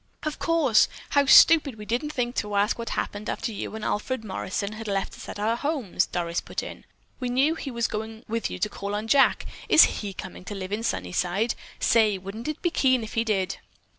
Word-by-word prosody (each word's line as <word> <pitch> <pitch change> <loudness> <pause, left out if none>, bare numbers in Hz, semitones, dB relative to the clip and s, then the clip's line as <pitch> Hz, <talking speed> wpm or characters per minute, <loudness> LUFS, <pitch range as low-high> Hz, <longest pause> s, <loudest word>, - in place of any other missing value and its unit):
"Of 305 -2 -3
course! 320 -9 +4 0.2
How 285 -1 +3
stupid 290 -3 +7
we 210 - -8
didn't 245 +8 -2
think 245 -4 -2
to 210 -1 -2
ask 205 +3 +1
what 230 - -4
happened 205 +1 -3
after - - -3
you 215 - -5
and 220 - -5
Alfred 225 +2 -2
Morrison 200 0 -3
had 220 +1 -7
left 195 -1 -2
us - - -10
at - - -6
our 215 +3 +1
homes," 255 - -1
Doris 170 -1 -2
put - - -5
in. - - -9 0.3
"We 250 -2 -2
knew 270 +6 +3
he 315 -3 -6
was 235 -2 -1
going 220 +1 -6
with 230 +1 -2
you - - -5
to 185 - 0
call 200 0 -5
on 215 +2 -3
Jack. 270 +4 +4 0.2
Is 320 - +6
he 200 -2 -5
coming 185 -1 -8
to 205 - -6
live 190 0 -6
in 210 +2 -1
Sunnyside? 180 - -1 0.3
Say, 215 -3 +3
wouldn't 195 +6 -7
it 305 - -4
be 345 - +2
keen 260 -6 +2
if 220 - -8
he 225 - +1
did?" 195 -5 -1
220 Hz, 220 wpm, -26 LUFS, 200-255 Hz, 0.3 s, stupid